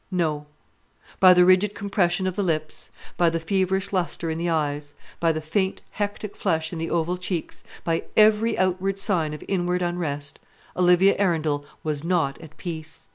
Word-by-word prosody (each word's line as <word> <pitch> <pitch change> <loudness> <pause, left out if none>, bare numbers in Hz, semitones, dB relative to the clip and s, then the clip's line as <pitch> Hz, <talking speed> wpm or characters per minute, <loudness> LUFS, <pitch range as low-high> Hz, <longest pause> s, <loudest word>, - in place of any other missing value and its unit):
No; 155 -5 -1 0.7
by 185 -1 +8
the 180 0 +6
rigid 185 +3 +4
compression 190 -2 0
of 185 -1 -1
the 205 - 0
lips, 155 -4 -2 0.3
by 170 -1 +4
the 165 0 -2
feverish 190 +3 0
lustre 170 -2 -1
in 160 - -3
the 170 +1 -1
eyes, 145 -2 -2 0.2
by 165 -1 +3
the 155 0 -3
faint 190 +5 -1
hectic 205 0 -4
flush 160 -3 -1
in 165 - -4
the 165 - -3
oval 170 +2 -1
cheeks, 180 -3 -4 0.2
by 165 -1 -1
every 220 +1 +4
outward 185 +1 0
sign 180 -6 +1
of 150 - -7
inward 180 -1 0
unrest, 145 -5 -3 0.4
Olivia 180 +2 +5
Arundel 155 -7 0 0.2
was 150 -2 -2
not 165 -6 0
at 160 -1 -13
peace! 160 - -8
175 Hz, 170 wpm, -24 LUFS, 160-190 Hz, 0.7 s, by